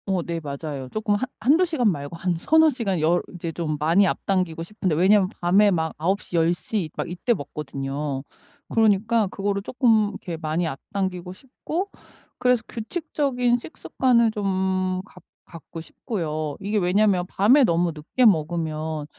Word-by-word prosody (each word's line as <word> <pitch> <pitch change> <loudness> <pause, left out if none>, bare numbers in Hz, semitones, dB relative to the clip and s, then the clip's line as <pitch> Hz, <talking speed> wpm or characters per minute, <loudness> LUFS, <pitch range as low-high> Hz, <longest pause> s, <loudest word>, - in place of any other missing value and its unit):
어 190 -3 0
네. 170 0 -3
맞아요. 140 -3 -6
쪼끔 215 - -1
한 260 +5 -2
1-2 295 +10 +4
시간 265 - +1
말고 145 -1 -6
한 180 +1 0
3-4 315 - +4
시간 205 - -1
10 170 +3 +3
이제 170 -1 -4
좀 155 -2 -3
많이 170 +6 +4
앞당기고 180 -4 -1
싶은데 185 -3 -2
왜냐면 190 +3 +4
밤에 195 +4 +5
막 160 -4 0
9 190 +6 0
시 - - -7
10 165 0 +3
시 185 -2 -3
막 - - -2
이때 180 +8 0
먹거든요. 140 -2 -4 0.5
그러니까 220 0 +3
그거를 200 +1 -2
쪼끔 225 -2 +2
이렇게 180 -4 -6
많이 160 +2 -1
앞당기고 180 +4 -4
싶고 305 - -5 0.5
그래서 250 -2 +2
규칙적인 250 -1 -1
식습관을 240 -3 +1
좀 190 -2 -1
갖 180 - -17 0.2
갖고 165 0 -10
싶고요. 155 - -4
이게 205 +2 -1
왜냐면 190 0 +2
밤에 235 +10 +4
너무 170 -2 +1
늦게 155 - -2
먹으면 160 -4 0
185 Hz, 295 characters per minute, -24 LUFS, 165-215 Hz, 0.5 s, 밤에